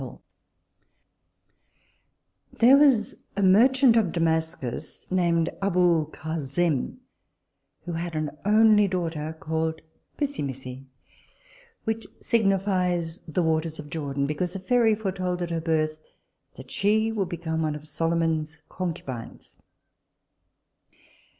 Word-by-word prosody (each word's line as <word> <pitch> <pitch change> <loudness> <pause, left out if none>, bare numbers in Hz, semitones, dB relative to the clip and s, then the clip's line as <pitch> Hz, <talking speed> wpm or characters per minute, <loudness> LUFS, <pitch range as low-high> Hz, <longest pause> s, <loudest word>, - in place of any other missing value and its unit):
_] - - -8 2.3
There 245 +4 +6
was 275 -7 +4 0.2
a 200 - +1
merchant 245 +6 +5
of 215 -7 +3
Damascus 160 -6 -2
named 170 -3 +2
Aboulcasem, 165 -4 0 0.9
who 175 - -4
had 165 0 -4
an 155 -1 -3
only 210 0 +5
daughter 160 -4 -3
called 160 0 -2 0.4
Pissimissi, 135 - -4 1.0
which 225 -1 -3
signifies 185 -6 +1
the 165 +3 0
waters 160 0 0
of 150 -1 -9
Jordan; 140 -3 -2
because 175 +6 -2
a - - -3
fairy 225 +2 +3
foretold 185 -4 -2
at 170 - -4
her 165 -1 -1
birth 155 -1 0 0.6
that 130 0 -12
she 220 +2 +2
would 200 -5 -2
be 175 - -4
one 160 -2 -2
of 150 +1 -10
Solomon's 165 -1 -1
concubines. 160 -10 -6
170 Hz, 105 wpm, -26 LUFS, 155-195 Hz, 2.3 s, There